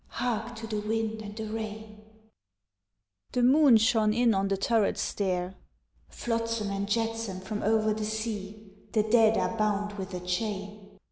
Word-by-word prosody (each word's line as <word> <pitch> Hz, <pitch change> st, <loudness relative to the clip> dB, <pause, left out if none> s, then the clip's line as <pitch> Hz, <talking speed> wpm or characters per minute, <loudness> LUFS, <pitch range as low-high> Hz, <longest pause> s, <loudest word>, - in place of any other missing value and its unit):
(Hark 240 Hz, -1 st, -3 dB
to 225 Hz, 0 st, -7 dB
the 215 Hz, -1 st, -2 dB
wind 220 Hz, +1 st, -2 dB
and 205 Hz, 0 st, -8 dB
the 220 Hz, -, -4 dB
rain.) 215 Hz, -1 st, -6 dB, 1.3 s
The 250 Hz, -, +1 dB
moon 270 Hz, -1 st, +7 dB
shone 220 Hz, -1 st, +3 dB
in 240 Hz, -1 st, +4 dB
on 195 Hz, 0 st, +1 dB
the 195 Hz, 0 st, 0 dB
turret 215 Hz, +1 st, +1 dB
stair 185 Hz, -2 st, -1 dB, 0.6 s
(_Flotsam 230 Hz, -3 st, -2 dB
and 200 Hz, +1 st, -3 dB
jetsam 225 Hz, -3 st, -1 dB
from 205 Hz, +3 st, -5 dB
over 215 Hz, 0 st, +2 dB
the 215 Hz, 0 st, -4 dB
sea, 215 Hz, -2 st, -5 dB, 0.2 s
The 215 Hz, -, +3 dB
dead 220 Hz, 0 st, +4 dB
are 230 Hz, -, 0 dB
bound 210 Hz, -1 st, -1 dB
with 190 Hz, -1 st, -5 dB
a -, -, -3 dB
chain. 200 Hz, +2 st, -4 dB
215 Hz, 155 wpm, -28 LUFS, 205-225 Hz, 1.3 s, moon